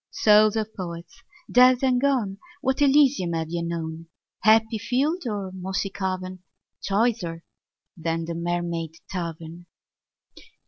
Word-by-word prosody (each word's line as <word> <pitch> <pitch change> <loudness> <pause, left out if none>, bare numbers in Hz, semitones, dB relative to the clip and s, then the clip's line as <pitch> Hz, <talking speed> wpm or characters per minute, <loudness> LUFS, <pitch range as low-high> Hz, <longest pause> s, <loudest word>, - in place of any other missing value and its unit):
Souls 215 0 +4
of 220 0 -2
Poets 170 - -8 0.3
dead 250 +1 +6
and 255 -2 +2
gone, 240 -9 0 0.2
What 265 0 0
Elysium 275 - +4
have 160 -1 -2
ye 170 0 -2
known, 165 -1 -5 0.3
Happy 220 +1 +3
field 265 - -1
or 200 -4 -3
mossy 190 +1 -3
cavern, 185 -1 -4 0.4
Choicer 195 -5 -1 0.5
than 165 0 -2
the 170 - -4
Mermaid 170 -1 -3
Tavern? 170 -1 -6
190 Hz, 120 wpm, -24 LUFS, 170-230 Hz, 0.5 s, dead